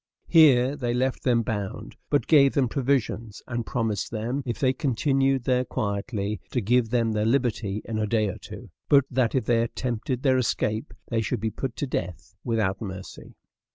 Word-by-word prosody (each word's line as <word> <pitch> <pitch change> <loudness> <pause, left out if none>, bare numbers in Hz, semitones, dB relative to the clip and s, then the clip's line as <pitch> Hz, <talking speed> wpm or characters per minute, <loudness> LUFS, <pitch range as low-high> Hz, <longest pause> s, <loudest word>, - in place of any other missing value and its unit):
Here 140 -5 +5
they 120 -4 -2
left 130 +1 0
them 120 -2 +2
bound, 105 -3 -4
but 145 - +2
gave 140 -4 +5
them 135 -3 +3
provisions, 120 -4 -1
and 120 -2 -4
promised 115 -5 -1
them, 120 +5 -2
if 120 - -2
they 130 -1 +2
continued 135 -1 +1
there 125 0 +2
quietly, 100 -3 -3
to 125 - -1
give 120 +2 +2
them 115 -1 +1
their 105 -1 0
liberty 115 -4 0
in 110 -1 -3
a 105 - 0
day 110 0 +1
or 95 - -5
two; - - -10 0.2
but 140 -2 +6
that 125 -1 +1
if 130 - +1
they 115 0 +3
attempted 125 +2 -3
their 130 -2 +4
escape 110 +1 -1
they 115 -2 +1
should 115 +3 -2
be 110 +1 -2
put 120 +3 -4
to - - -2
death 90 - -5
without 105 -5 0
mercy. 95 -3 -8
120 Hz, 185 wpm, -25 LUFS, 110-130 Hz, 0.2 s, but